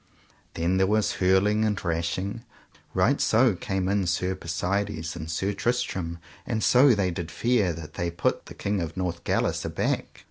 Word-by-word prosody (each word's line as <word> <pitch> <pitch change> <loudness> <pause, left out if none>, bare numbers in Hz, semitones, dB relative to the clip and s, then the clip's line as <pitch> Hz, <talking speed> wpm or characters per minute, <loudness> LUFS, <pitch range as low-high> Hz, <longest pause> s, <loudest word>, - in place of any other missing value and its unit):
Then 85 +3 +1
there 95 0 +3
was 105 +1 +2
hurling 95 +4 +3
and 105 -2 +1
rashing. 90 +4 -2 0.5
Right - - +3
so 115 0 +4
came 95 -2 -2
in 100 -1 +1
Sir 90 +1 0
Persides 85 -1 -2
and 80 +1 -6
Sir 95 +6 -1
Tristram 100 -6 -1 0.3
and 110 -1 -2
so 130 0 +6
they 95 -3 +1
did 85 -1 -5
fare 115 +1 +1
that 75 -1 -9
they 85 0 -2
put 85 -1 -1
the - - -10
King 100 -1 -1
of 85 +2 -5
Northgalis 90 -2 -1
aback. - - -2
95 Hz, 165 wpm, -26 LUFS, 85-105 Hz, 0.5 s, so